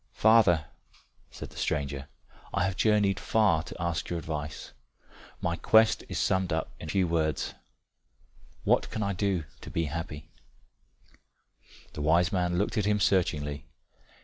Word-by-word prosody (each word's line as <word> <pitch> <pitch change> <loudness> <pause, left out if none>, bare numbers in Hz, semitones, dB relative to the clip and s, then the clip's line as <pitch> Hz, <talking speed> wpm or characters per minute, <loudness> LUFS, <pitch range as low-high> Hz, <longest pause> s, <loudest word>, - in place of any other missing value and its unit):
"Father," 105 -8 +5 0.6
said - - -9
the - - -14
stranger, 70 -2 -2 0.5
"I - - +2
have 95 0 -1
journeyed 105 -3 +2
far 105 -8 +2
to 90 - -10
ask 85 -1 -2
your 85 - -2
advice. 75 -2 -5 0.7
My 85 - 0
quest 110 +5 +4
is - - -3
summed 95 -2 +1
up 80 0 -1
in 80 - -7
few 95 +1 +2
words, 80 -3 -1 1.1
What - - +2
can 110 - -3
I 100 0 -1
do 95 -2 0 0.2
to - - -10
be 85 - -1
happy?" 75 -1 -6 1.6
The - - -5
wise 85 +5 +3
man 90 -3 0
looked 105 +4 0
at 100 - 0
him 105 0 +2
searchingly. 75 -8 0
85 Hz, 145 wpm, -28 LUFS, 80-100 Hz, 1.6 s, Father